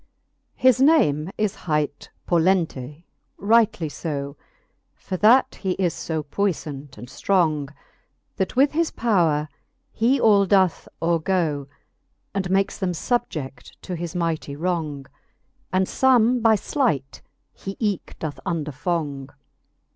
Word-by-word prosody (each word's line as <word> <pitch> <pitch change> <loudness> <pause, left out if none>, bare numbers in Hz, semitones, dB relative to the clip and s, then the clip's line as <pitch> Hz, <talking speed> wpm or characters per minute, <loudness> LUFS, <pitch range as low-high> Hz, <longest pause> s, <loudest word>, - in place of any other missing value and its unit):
VII. - - -30
His 255 0 +5
name 185 - +4
is 215 -2 0
hight 150 -3 -2 0.2
Pollente, 165 -5 0 0.3
rightly 210 -5 +2
{6, 140 -2 -4 0.6
For 190 - -6
that 235 +7 +5
he 190 -2 0
is 180 -3 0
fb 160 -2 -3
puiflant 145 - -3
and 120 +3 -9
ftrong, 155 -2 0 0.7
That 190 - -2
with 275 +3 +4
his 330 +1 +1
powre 165 -10 +1 0.4
he 245 +5 +2
all 200 -3 +4
doth 190 -3 +2 0.2
overgo, 165 -4 0 0.7
And 190 -2 -2
makes 195 +1 +1
them 185 -3 -1
fubje£t 155 - -3
to 180 - -4
his 175 +1 -5
mighty 165 -4 -2
wrong; 155 -4 -2 0.7
And 185 0 +2
Ibme 250 +1 +3
by 225 -1 +5
Height 200 - -1 0.3
he 195 0 -7
eke 205 -5 -2
doth 155 -3 -5
underfong. 150 -4 -3
175 Hz, 120 wpm, -23 LUFS, 150-205 Hz, 0.7 s, His